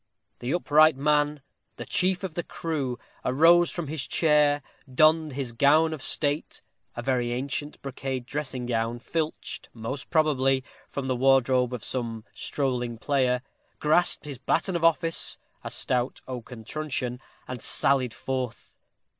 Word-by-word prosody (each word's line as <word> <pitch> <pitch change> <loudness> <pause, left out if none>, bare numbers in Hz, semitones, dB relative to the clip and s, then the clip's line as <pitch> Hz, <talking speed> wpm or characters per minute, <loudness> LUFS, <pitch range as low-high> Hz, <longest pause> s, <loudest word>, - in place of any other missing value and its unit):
The 125 +2 -3
upright 155 -2 +5
man, 150 0 +1 0.3
the - - -7
chief 185 +1 +1
of 185 -4 -4
the 175 - -1
crew, 160 -8 -3 0.3
arose 165 +6 +5
from 175 - -3
his 145 -3 -4
chair, 150 -3 +3 0.3
donned 155 +2 +4
his 130 -3 -4
gown 155 +6 +4
of 155 - -6
state, 145 +2 -1 0.3
a - - -3
very 125 -3 0
ancient 140 +4 -3
brocade 135 -2 -4
dressing 130 -2 -3
gown, 115 0 -1
filched, 155 +5 -4
most 120 +5 -5
probably, 135 -5 +2 0.3
from 140 - -4
the 130 -1 0
wardrobe 130 -1 +3
of 125 -4 -5
some 115 -3 -3
strolling 125 -4 -2
player, 125 -1 +1 0.3
grasped 165 +2 +2
his 140 -4 -7
baton 180 +7 0
of 170 - -1
office, 165 0 +2 0.3
a - - -4
stout 125 0 0
oaken 125 -2 -7
truncheon, 130 -3 -3 0.3
and 125 -2 -6
sallied 130 -4 +1
forth. 130 -3 -4
135 Hz, 140 wpm, -27 LUFS, 125-155 Hz, 0.3 s, upright